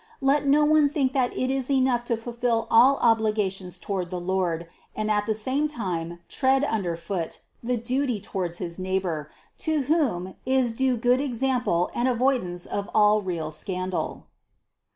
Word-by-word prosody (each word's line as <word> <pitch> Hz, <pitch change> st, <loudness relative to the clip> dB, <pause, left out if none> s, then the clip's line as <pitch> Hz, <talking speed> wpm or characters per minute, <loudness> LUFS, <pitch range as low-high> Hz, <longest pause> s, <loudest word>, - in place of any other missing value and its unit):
Let 280 Hz, 0 st, +2 dB
no 295 Hz, +2 st, +5 dB
one 305 Hz, -1 st, +4 dB
think 275 Hz, -3 st, 0 dB
that 255 Hz, -3 st, +1 dB
it 255 Hz, +1 st, 0 dB
is 270 Hz, -1 st, -1 dB
enough 260 Hz, -3 st, +2 dB
to 235 Hz, -1 st, 0 dB
fulfill 235 Hz, 0 st, -1 dB
all 255 Hz, +5 st, +6 dB
obligations 210 Hz, -5 st, +1 dB
toward 185 Hz, -2 st, -3 dB
the 180 Hz, 0 st, -4 dB
Lord, 175 Hz, -2 st, -1 dB, 0.3 s
and 215 Hz, 0 st, -1 dB
at 210 Hz, 0 st, +1 dB
the 220 Hz, -, +1 dB
same 260 Hz, +8 st, 0 dB
time 175 Hz, -, -4 dB
tread 265 Hz, +1 st, +2 dB
under 195 Hz, -11 st, -1 dB
foot 170 Hz, 0 st, -4 dB, 0.2 s
the 245 Hz, +1 st, -1 dB
duty 245 Hz, 0 st, -1 dB
towards 180 Hz, -3 st, -3 dB
his 175 Hz, -1 st, -5 dB
neighbor, 185 Hz, -5 st, -2 dB, 0.3 s
to 315 Hz, -2 st, +1 dB
whom 245 Hz, -, 0 dB
is 260 Hz, -2 st, +2 dB
due 255 Hz, +1 st, +1 dB
good 245 Hz, +3 st, +3 dB
example 250 Hz, -9 st, 0 dB
and 240 Hz, +2 st, 0 dB
avoidance 240 Hz, -8 st, 0 dB
of 200 Hz, 0 st, -4 dB
all 210 Hz, 0 st, +5 dB
real 170 Hz, -5 st, -3 dB
scandal. 185 Hz, +3 st, -4 dB
225 Hz, 160 wpm, -25 LUFS, 185-260 Hz, 0.3 s, all